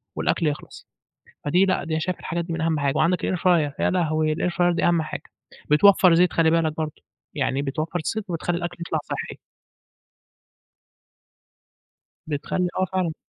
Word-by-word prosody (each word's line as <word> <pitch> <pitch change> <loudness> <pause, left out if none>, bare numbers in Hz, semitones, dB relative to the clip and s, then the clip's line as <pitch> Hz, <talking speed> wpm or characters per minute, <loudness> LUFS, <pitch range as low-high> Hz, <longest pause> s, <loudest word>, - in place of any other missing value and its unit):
والأكل 165 - 0
يخلص، 150 0 -6 0.6
فدي 180 +6 +3
لأ 190 - 0
دي 160 -1 -2
شايف 180 +2 -2
الحاجات 170 +1 -3
دي 170 - -5
من 165 - -3
أهم 160 -1 +1
حاجة 140 -1 0
وعندك 175 +3 +1
الair 185 - -1
fryer 170 -5 +2
يا - - +2
لهوي! 155 -3 +1
الair 175 +2 -1
fryer 175 0 +2
دي - - 0
أهم 170 -2 +3
حاجة، 155 - -6 0.5
بتوفّر 185 +2 +6
زيت 175 +1 +4
خلّي 165 -1 +3
بالك 160 -2 +1
برضه، 155 -1 -5 0.3
يعني 135 +2 0
بتوفّر 155 +5 -3 0.2
زيت 220 -2 -3
وبتخلّي 170 +1 -1
الأكل 175 0 -5
يطلع 160 - -1
صحّي. - - -6 2.9
بتخلّي 160 +4 -1
آه، 185 - +3
فعلًا. 185 -4 -1
165 Hz, 165 wpm, -24 LUFS, 155-180 Hz, 2.9 s, بتوفّر